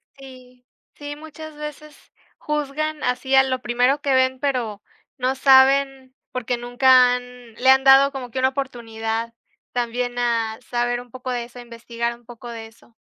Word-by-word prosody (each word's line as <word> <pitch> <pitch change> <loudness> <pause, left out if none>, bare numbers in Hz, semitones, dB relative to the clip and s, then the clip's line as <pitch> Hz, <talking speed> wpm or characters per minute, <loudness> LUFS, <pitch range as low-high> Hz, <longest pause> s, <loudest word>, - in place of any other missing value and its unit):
Sí. 255 -2 -15 0.3
Sí, 290 0 -7
muchas 315 0 -11
veces 300 0 -10 0.3
juzgan 300 +1 -3
así 265 +2 0
a 265 - +7
lo 260 -1 -2
primero 250 +4 +1
que 280 -1 0
ven, 260 0 +2
pero 245 -7 -2 0.4
no 255 +1 0
saben 270 0 +4 0.2
porque 250 -1 -2
nunca 250 +1 +4
han 245 -2 -10
le 260 +2 +2
han 265 0 +6
dado 270 +1 +7
como 255 -4 -7
que 260 - -3
una 260 0 +3
oportunidad 230 -4 -4 0.4
también 245 0 -2
a 230 -2 -1
saber 240 0 0
un 245 -2 -17
poco 255 0 -7
de 240 -1 -2
eso, 240 +1 -12
a - - -8
investigar 235 0 -5
un 240 0 -24
poco 240 0 -11
de 230 -1 -7
eso. 225 +1 -23
250 Hz, 170 wpm, -22 LUFS, 240-270 Hz, 0.4 s, a